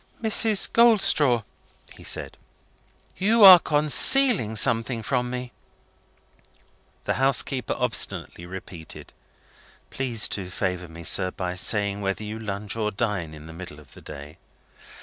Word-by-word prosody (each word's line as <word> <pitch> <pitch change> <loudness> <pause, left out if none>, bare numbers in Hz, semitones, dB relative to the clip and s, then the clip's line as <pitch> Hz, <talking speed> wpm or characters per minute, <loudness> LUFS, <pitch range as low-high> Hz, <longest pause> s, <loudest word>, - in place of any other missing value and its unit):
"Mrs. 220 -2 +1
Goldstraw," 190 - +4 0.5
he - - -15
said, - - -3 0.8
"you 220 +3 +2
are 185 -2 +11
concealing 155 - +3
something 115 +1 0
from 125 +1 -2
me!" 125 0 -6 1.5
The - - -2
housekeeper 135 -2 +1
obstinately 110 -7 -3
repeated, 90 -3 -11 0.8
"Please 120 -5 0
to 95 -3 -5
favour 90 -1 -4
me, 85 +1 -12
sir, 90 +2 0
by 90 -1 -5
saying 100 +2 -1
whether 100 +2 -3
you 105 +1 -7
lunch, 100 -1 -5
or 110 -2 -2
dine, 100 -7 -4
in 75 0 -13
the 80 - -11
middle 85 -3 -10
of 75 - -17
the - - -14
day?" 75 +1 -12
110 Hz, 130 wpm, -23 LUFS, 90-135 Hz, 1.5 s, are